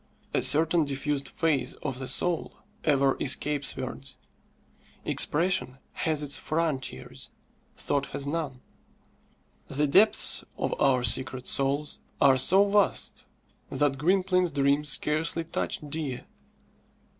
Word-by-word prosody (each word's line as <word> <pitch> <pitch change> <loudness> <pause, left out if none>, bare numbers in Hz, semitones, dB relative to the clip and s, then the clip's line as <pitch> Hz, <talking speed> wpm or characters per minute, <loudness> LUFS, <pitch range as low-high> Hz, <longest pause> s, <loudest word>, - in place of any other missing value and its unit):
A - - +2
certain 165 +2 +2
diffused 140 0 -2
phase 150 -6 0
of 130 -1 -3
the 130 - -5
soul 175 +3 -1 0.3
ever 140 -3 +3
escapes 145 -1 0
words. 130 +1 -6 0.9
Expression 165 -4 +1
has 155 -2 -1
its 145 -1 -1
frontiers, 155 -5 -3 0.5
thought 140 -1 -1
has 140 - -4
none. 145 -4 -3 1.1
The 145 +2 0
depths 195 +10 +4
of - - -1
our 130 -2 +3
secret 130 +2 0
souls 140 +2 -1 0.2
are 135 -1 +6
so 190 +9 +5
vast 205 0 +1 0.4
that 145 -2 0
Gwynplaine's 180 +2 +2
dreams 140 0 +1
scarcely 155 +3 +1
touched 155 -2 -3
Dea. 145 -4 -4
145 Hz, 110 wpm, -27 LUFS, 135-165 Hz, 1.1 s, are